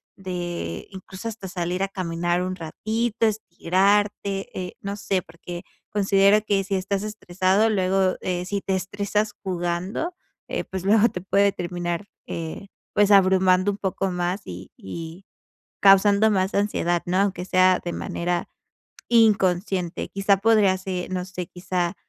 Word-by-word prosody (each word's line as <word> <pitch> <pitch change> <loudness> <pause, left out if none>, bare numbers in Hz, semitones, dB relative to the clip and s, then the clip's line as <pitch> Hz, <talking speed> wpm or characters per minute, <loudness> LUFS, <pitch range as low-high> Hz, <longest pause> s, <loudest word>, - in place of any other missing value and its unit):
de 175 - -5
incluso 190 +2 -8
hasta 220 -3 -6
salir 180 0 -3
a 195 - +1
caminar 175 -1 -1
un 185 0 -3
ratito, 220 +7 -1
estirarte, 200 -1 +1
eh, 180 -1 -6
no 200 0 -4
sé 195 -3 -1
porque 175 +1 -9 0.3
considero 200 0 +4
que 200 -2 +1
si 195 +1 -4
estás 195 +1 -1
estresado, 200 0 +1
luego, 190 -2 +2
eh, 180 -1 -2
si 200 +1 -2
te 195 - -2
estresas 205 +3 -1
jugando, 185 - -2 0.3
eh, - - -2
pues 190 0 -6
luego 215 +2 +5
te 180 - -6
puede 200 +1 +3
terminar, 175 0 -3 0.2
eh, 165 +4 -6 0.3
pues 205 0 +4
abrumando 185 -1 +5
un 200 - -6
poco 190 -1 -2
más 180 +2 -1
y 90 +1 -9
y 165 - -8 0.5
causando 200 +2 +6
más 190 -1 +1
ansiedad, 175 -4 +1
¿no?, 180 +1 0
aunque 195 -3 0
sea 185 0 +4
de 175 - -3
manera 175 0 -2 0.6
inconsciente, 190 -5 +2
quizá 195 0 +2
podría 205 -2 +4
ser, 185 -1 -4
no 180 -1 -2
sé, 180 -2 -6
quizá 180 0 -2
190 Hz, 145 wpm, -24 LUFS, 180-200 Hz, 0.6 s, causando